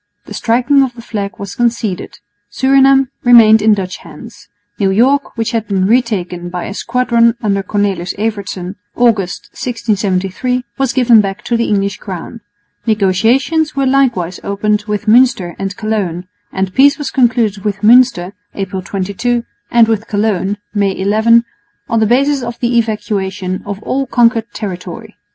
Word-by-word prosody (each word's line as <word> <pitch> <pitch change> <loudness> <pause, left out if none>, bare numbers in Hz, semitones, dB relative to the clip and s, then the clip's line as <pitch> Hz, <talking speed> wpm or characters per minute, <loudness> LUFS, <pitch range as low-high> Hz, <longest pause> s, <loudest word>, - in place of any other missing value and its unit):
The - - -10
striking 250 +5 +2
of 255 -3 -1
the 235 - -10
flag 200 -3 -5
was 200 -1 -7
conceded. 235 -6 -2 0.3
Surinam 270 +3 +3
remained 225 -3 +6
in 215 0 +4
Dutch 185 -2 -5
hands. 175 +3 -13 0.3
New 195 -2 +2
York, 255 +8 +1
which 225 +1 -1
had 225 -2 -2
been 190 -2 0
retaken 190 -6 -1
by 180 0 -5
a 200 - -6
squadron 235 0 +1
under 200 -2 0
Cornelis 195 -3 -2
Evertsen, 200 -3 -4 0.2
August, 215 -7 0
1673, 215 +1 -2 0.2
was 270 -2 +1
given 240 -4 +5
back 195 +1 -5
to 240 - -1
the 230 0 +1
English 200 -1 0
crown. 195 +4 -8 0.5
Negotiations 230 - +1
were 275 -1 0
likewise 240 -10 +1
opened 210 +1 -1
with 210 0 -3
Münster 230 -6 +3
and 195 +1 -4
Cologne; 200 -6 -3 0.2
and 190 -1 -3
peace 280 +1 +4
was 290 -3 -4
concluded 230 -5 +1
with 200 -2 -3
Münster 220 -5 +4 0.2
(April 190 -1 -4
22) 200 +6 -2 0.3
and 235 -1 +4
with 220 -1 -1
Cologne 205 -1 -1 0.2
(May 200 -2 0
11) 220 +4 +3 0.4
on 230 - 0
the 220 - +2
basis 275 +4 +2
of 235 -1 -5
the 240 0 0
evacuation 195 -4 -3
of 200 -1 -5
all 270 0 -2
conquered 235 -1 +2
territory. 180 -4 -7
215 Hz, 150 wpm, -14 LUFS, 195-240 Hz, 0.5 s, remained